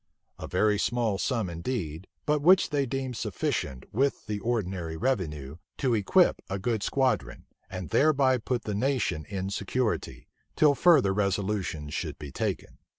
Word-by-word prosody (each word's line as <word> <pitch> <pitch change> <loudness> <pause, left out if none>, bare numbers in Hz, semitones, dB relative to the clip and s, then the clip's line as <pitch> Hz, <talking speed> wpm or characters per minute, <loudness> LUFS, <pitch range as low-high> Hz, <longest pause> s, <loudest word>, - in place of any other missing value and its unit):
a - - -6
very 105 -1 +2
small 115 -3 0
sum 115 -5 0
indeed; 85 -2 -4 0.2
but 150 -1 +1
which 180 +2 +5
they 140 -2 +1
deemed 130 0 -3
sufficient, 65 - -2
with 135 +5 0
the 105 -1 -3
ordinary 95 -7 -2
revenue, 80 - -2 0.2
to 130 -3 +1
equip 105 -3 +3
a 95 - -2
good 110 +2 -1
squadron, 125 - 0 0.2
and 90 -4 -6
thereby 135 -4 +4
put 120 +1 -2
the 105 - -3
nation 115 - 0
in 95 -1 -3
security, 110 +4 -2 0.3
till 150 -2 +5
further 140 - +5
resolutions 95 -6 -1
should - - -3
be 75 -2 -8
taken. - - -3
105 Hz, 150 wpm, -28 LUFS, 90-130 Hz, 0.3 s, which